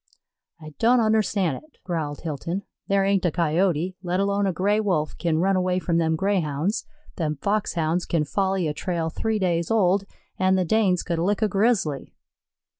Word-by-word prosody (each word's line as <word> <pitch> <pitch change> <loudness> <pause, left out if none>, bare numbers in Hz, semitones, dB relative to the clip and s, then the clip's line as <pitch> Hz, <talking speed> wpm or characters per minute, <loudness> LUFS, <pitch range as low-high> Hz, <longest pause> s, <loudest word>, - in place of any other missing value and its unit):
"I 155 -1 -11
don't 240 +2 +4
unnerstan' 215 -6 +2
it," 310 -1 -17
growled 160 -5 -3
Hilton. 165 +5 -4 0.2
"There 195 0 +2
ain't 195 -1 +2
a 175 - +3
Coyote, 170 +2 0
let 180 0 -1
alone 200 0 +1
a - - +1
Gray 200 +5 +1
wolf, 180 -8 0
kin 165 -3 +1
run 190 +4 +2
away 185 0 +1
from 170 -2 0
them 160 -1 +1
Greyhounds; 185 - -1 0.3
them 155 -3 -1
Foxhounds 175 -4 0
kin 160 -3 +1
folly 190 +1 0
a 150 - -1
trail 165 0 -2
three 220 +5 -1
days 170 -4 0
old, 200 -3 +2 0.3
an' 185 0 +3
the 185 -1 +1
Danes 190 -2 +2
could 170 -2 -2
lick 205 +6 +1
a - - +4
Grizzly." 195 - 0
185 Hz, 175 wpm, -24 LUFS, 165-200 Hz, 0.3 s, don't